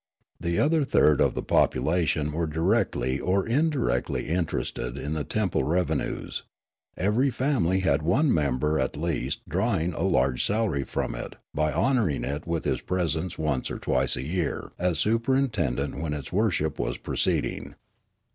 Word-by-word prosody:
The 85 0 -1
other 155 +1 +3
third 75 - +4
of - - +2
the - - -2
population 75 +2 +2
were 80 +2 -1
directly 70 -4 +1
or 95 +1 +1
indirectly 130 - 0
interested 85 0 -2
in 75 - -3
the 80 -1 -1
temple 105 0 0
revenues; 90 +3 -1 0.6
ever}^ 115 +8 +2
family 115 - +1
had 80 -6 +2
one 125 - +3
member 75 0 +1
at 65 - -1
least 85 0 -2
drawing 85 +2 0
a - - -4
large 65 0 +2
salary 100 -11 0
from - - -2
it - - -6 0.2
by 75 0 +1
honouring 115 - +1
it 70 +4 -4
with 85 -2 -2
his - - 0
presence 90 -1 -1
once 75 -5 -1
or - - -4
twice 65 0 +1
a - - -4
year 85 +1 -2
as 90 -2 +1
superintendent 115 - +1
when 75 -1 -2
its 75 +2 -6
worship 90 -7 +1
was - - -1
proceeding. - - -1
85 Hz, 150 wpm, -26 LUFS, 75-105 Hz, 0.6 s, third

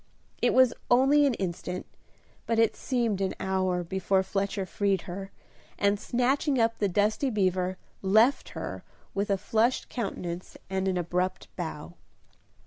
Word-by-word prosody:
It - - +3
was 255 -2 +6 0.2
only 275 +4 +5
an 260 - +1
instant, 180 -1 -4 0.6
but 230 0 +1
it 225 0 +3
seemed 235 -6 -1
an 190 -1 -1
hour 185 -2 0
before 190 +2 +1
Fletcher 195 0 -2
freed 195 0 0
her, 195 +2 -6 0.5
and 200 0 +2
snatching 265 +5 +1
up 230 0 +2
the 205 - +2
dusty 210 +8 +1
beaver, 185 -4 0 0.2
left 220 +8 +4
her - - -5 0.3
with 200 +1 -1
a 200 - +2
flushed 225 +6 +1
countenance 180 -6 -5
and 190 0 0
an 185 -1 +1
abrupt 180 +2 -2
bow. 165 -1 -5
195 Hz, 140 wpm, -28 LUFS, 185-230 Hz, 0.6 s, was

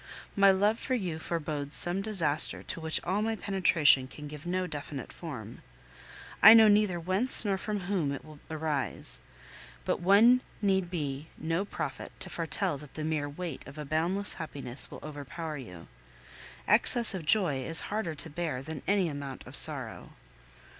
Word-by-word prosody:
My 200 0 +5
love 205 +4 +1
for 260 - -2
you 180 -9 -4
forebodes 150 -3 -3
some 175 +2 +8
disaster 170 -8 -1
to - - -5
which 160 0 0
all 190 +4 -2
my 225 +1 -2
penetration 170 -10 +2
can 150 +2 -11
give 150 +3 -10
no 185 +1 -2
definite 145 -5 -8
form. - - -9 0.8
I 220 - +10
know 220 -1 +7
neither 205 -4 +2
whence 190 +9 +6
nor 200 -1 0
from 210 -1 -4
whom 175 -6 -2
it 140 - -7
will 155 -1 -14
arise; 155 -3 -1 0.6
but - - -1
one 215 +7 +4 0.2
need 190 -3 0
be 150 -4 -5
no 165 +5 -3
prophet - - -7
to - - -2
foretell 155 -3 -3
that 150 -1 -15
the 155 - -5
mere 155 -2 -3
weight 160 0 -7
of 140 +2 -12
a 150 - -7
boundless 170 +7 -1
happiness 140 -6 -3
will - - -11
overpower 150 +1 -7
you. 90 -11 -11 0.8
Excess 235 -4 +6
of 185 -4 -6
joy 160 -5 +2
is 165 +5 +2
harder 195 -7 -3
to 150 - -7
bear 155 -5 -4
than 155 -1 -8
any 195 -3 +1
amount 140 -3 -8
of - - -11
sorrow. - - -3
165 Hz, 165 wpm, -28 LUFS, 145-195 Hz, 0.8 s, I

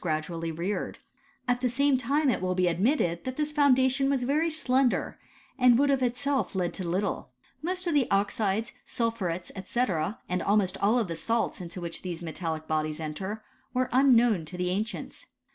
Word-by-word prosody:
71 155 -3 +1 0.2
p;adually 165 0 -2
reared: 190 +5 -2 0.5
at 245 0 +1
the 250 - +2
same 280 +3 +3
time 275 +3 +2
it - - -2
will 185 0 0
be 185 0 +2
admitted 175 - +1
that 260 0 -5
this 300 0 -1
foundation 270 -2 +3
was 270 -3 +1
very 300 +6 +1
slender, 265 -5 +1 0.4
and 250 -2 +6
would 280 +1 +3
of 270 -1 +1
itself 265 +3 0
have - - -13
led 180 -2 0
to 185 - -4
little. 195 +4 -1 0.3
Most 365 +3 -3
of 340 - 0
the 280 -4 +2
oxides, 200 +2 0
sul 230 -1 -1
phurets, 180 -6 -4
&c., 235 - -4 0.5
and 180 0 -1
almost 200 -2 +2
all 225 +4 +3
the 170 -5 -5
salts 225 +3 -1
into 175 +1 -7
which 170 -1 -4
these 175 -2 -5
metallic 160 -1 -4
bodies 155 0 -1
enter, 190 +8 -5 0.3
were 255 0 +1
unknown 245 -7 +4
to 180 +3 -9
the 180 0 -1
ancients. 215 +5 -4
225 Hz, 185 wpm, -28 LUFS, 180-260 Hz, 0.5 s, and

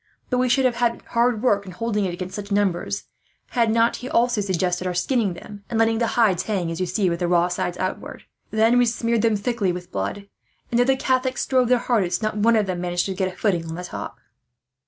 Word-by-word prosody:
But 250 - +2
we 255 0 +2
should 265 +2 +3
have 245 -2 +1
had 235 -1 0
hard 235 -1 +1
work 205 -5 +3
in 185 - -8
holding 210 +1 -1
it, 180 - -2
against 185 +1 -6
such 205 0 -7
numbers, 200 0 0 0.5
had 235 -2 +2
he 220 - +1
not 230 +2 +2
also 240 -3 +2
suggested 185 -1 -1
our 180 - -2
skinning 205 0 0
them, 205 +3 -11
and 230 - -2
letting 225 0 +2
the 235 - +1
hides 200 -7 +4
hang 185 -5 -2
as 165 - -5
you 185 - -1
see, 185 +2 0
with 170 -1 -1
the 175 - 0
raw 175 0 +3
sides 175 0 -2
outwards. 185 - -4 0.3
Then 225 +3 +3
we 245 - +4
smeared 230 -1 0
them 225 -1 +2
thickly 205 -2 0
with 180 0 -7
blood 100 - -4 0.4
and, 240 - +2
though 245 - +4
the 265 +1 +3
Catholics 260 -1 0
strove 255 -2 +2
their 250 +1 +4
hardest, 210 -6 0
not 215 0 -1
one 225 +2 +3
of 215 -2 +2
them 180 -2 -3
managed 175 0 -1
to 195 - -2
get 185 0 -1
a - - -16
footing 175 -6 0
on 160 - -5
the 180 - -6
top." 180 - -7
205 Hz, 240 wpm, -23 LUFS, 180-235 Hz, 0.5 s, hides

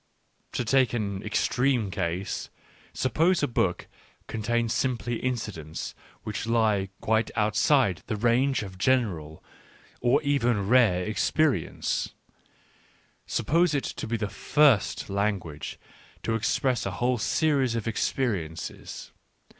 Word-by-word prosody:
To 125 - -1
take 130 -1 +3
an 100 -4 -2
extreme 120 0 +1
case, 95 0 -3 0.4
suppose 160 +8 +2
a - - +3
book 95 -7 0 0.4
contains 115 +1 -1
simply 120 -2 -1
incidents 105 -11 -4 0.3
which 105 +1 -4
lie 110 -4 +2
quite 110 0 +1
outside 105 - +2
the - - -1
range 120 +4 +2
of 95 -2 -9
general 95 - 0 0.6
or 125 +4 +4
even 120 -8 +1
rare 105 -7 +4
ex 110 - 0
perience 140 - 0 0.5
— - - -34
suppose 165 0 +2
it 140 - 0
to - - -5
be 115 +1 -1
the 105 -1 -2
first 135 +4 +2
language 100 -7 -2 0.5
to 115 - 0
express 120 +2 0
a - - -2
whole 125 +2 +1
series 135 -2 +1
of 115 -1 -3
experiences. 105 -8 -3
115 Hz, 120 wpm, -27 LUFS, 100-130 Hz, 0.6 s, or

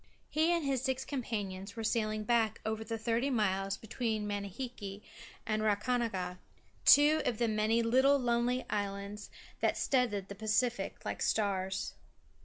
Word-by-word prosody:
He 315 +3 +3
and 340 -3 +1
his 270 -3 0
six 265 0 -1
companions 205 -7 -4
were 225 - -4
sailing 215 -1 0
back 225 -1 +2
over 220 0 -2
the 225 +1 -4
thirty 230 +4 0
miles 195 -5 0
between 220 -2 -2
Manihiki 205 0 -5 0.4
and 215 0 0
Rakahanga, 210 -4 0 0.5
two 300 +2 +7
of 235 - 0
the 235 - +1
many 220 +2 +2
little 260 +5 +4
lonely 245 0 +1
ocean - - -14
islands 200 0 -3 0.3
that - - +1
stud 250 -3 +2
the 200 -1 -5
Pacific 220 +4 -1
like - - -3
stars. 195 -2 0
220 Hz, 145 wpm, -32 LUFS, 205-245 Hz, 0.5 s, two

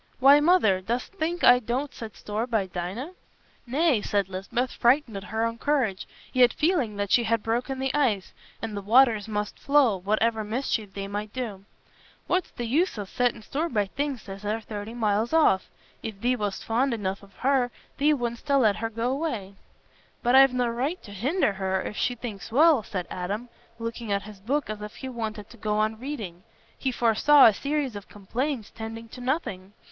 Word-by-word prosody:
"Why, 275 +3 +8
Mother, 295 - +4
dost 240 - -3
think 345 -1 -2
I 245 0 +8
don't 250 +4 -3
set 220 -3 -8
store 215 +3 -3
by 220 -5 +1
Dinah?" 190 - -5 0.6
"Nay," 275 -2 +2
said 200 -2 0
Lisbeth, 195 +7 -2
frightened 240 -2 +2
at 195 0 -6
her 220 +1 -1
own 230 0 -3
courage, 250 -10 0 0.3
yet 250 -1 +5
feeling 300 - +1
that 200 -1 -3
she 235 - +4
had 225 -1 +1
broken 245 +4 -1
the 265 0 -1
ice, 240 -10 +1 0.3
and 220 -2 -3
the 200 - -3
waters 225 0 +4
must 210 -1 -3
flow, 280 -7 +4
whatever 215 +4 +1
mischief 215 -3 -2
they 195 0 -4
might 205 +1 -4
do. 215 -7 -5 0.6
"What's 370 -1 0
th' - - -9
use 280 +7 +1
o' 205 - -3
settin' 235 +2 -1
store 315 +8 -2
by 210 -7 +1
things 275 +3 -4
as 195 +1 -8
are 210 +2 -1
thirty 215 +1 -7
mile 220 0 +1
off? 300 -13 +4 0.3
If 215 -3 -6
thee 245 +4 +2
wast 205 -4 -3
fond 240 +3 +1
enough 195 -2 -3
on 200 - -15
her, 260 -2 +2 0.3
thee 295 +2 +4
wouldstna 245 +3 0
let 215 -5 +3
her 225 +1 -2
go 230 +3 -1
away." 250 -10 -3 0.7
"But 245 - +3
I've 270 0 +8
no 250 -1 +1
right 260 +9 -2
t' 205 - -11
hinder 240 - +1
her, 190 -1 -1
if 210 - -5
she 245 - 0
thinks 225 -3 -7
well," 300 +1 +5
said 185 -4 -4
Adam, 205 +7 -4 0.3
looking 230 -1 -5
at 200 0 0
his 210 -1 -11
book 270 +8 -1
as 215 -1 -5
if 210 0 -7
he 265 - -6
wanted 220 -4 -5
to 235 - -13
go 210 -1 -1
on 215 +1 0
reading. 220 -11 -6 0.3
He 265 - -1
foresaw 245 +5 +5
a 220 - +7
series 280 0 -2
of 205 -1 -9
complaints 235 +4 -3
tending 225 0 -7
to 250 - -10
nothing. 210 - -3
230 Hz, 195 wpm, -26 LUFS, 205-265 Hz, 0.7 s, Why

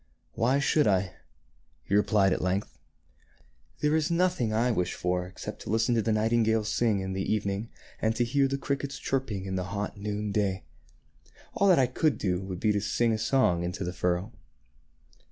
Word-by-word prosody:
" - - -44
Why 125 +4 +1
should 145 +1 +2
I? 95 -2 +1 0.4
" - - -39
he - - -3
replied 100 -2 +3
at - - -2
length. 95 +2 -1 0.5
" - - -35
There 150 +1 +2
is 160 +1 +1
noth 180 0 +1
ing 110 -2 0
I 115 +3 +2
wish 90 -5 -1
for 90 0 -1
except 90 - -8
to - - -8
listen 115 +3 +2
to 115 - +2
the 110 - 0
nightingales 110 0 +1
singing 110 -5 +1
in 95 0 -4
the 95 0 -2
evening 105 +1 -1 0.3
and 110 0 +1
to 120 - +2
hear 135 +3 +2
the 135 +1 -2
crickets 140 0 -3
chirping 125 -8 -2
in 95 -1 -3
the 90 - -2
hot 100 +2 -4
noon 105 0 -3
day. 95 -4 0 0.9
All 200 - +2
that 185 -3 +6
I 130 - +5
could 140 +5 0
do 90 -2 -1
would 95 -2 -6
be 110 - +2
to 105 -1 0
sing 115 +2 +1
a 110 - -1
song 110 -7 +2
into 90 +2 -3
the 90 0 -3
furrow." 90 +5 -1
105 Hz, 205 wpm, -28 LUFS, 95-120 Hz, 0.9 s, that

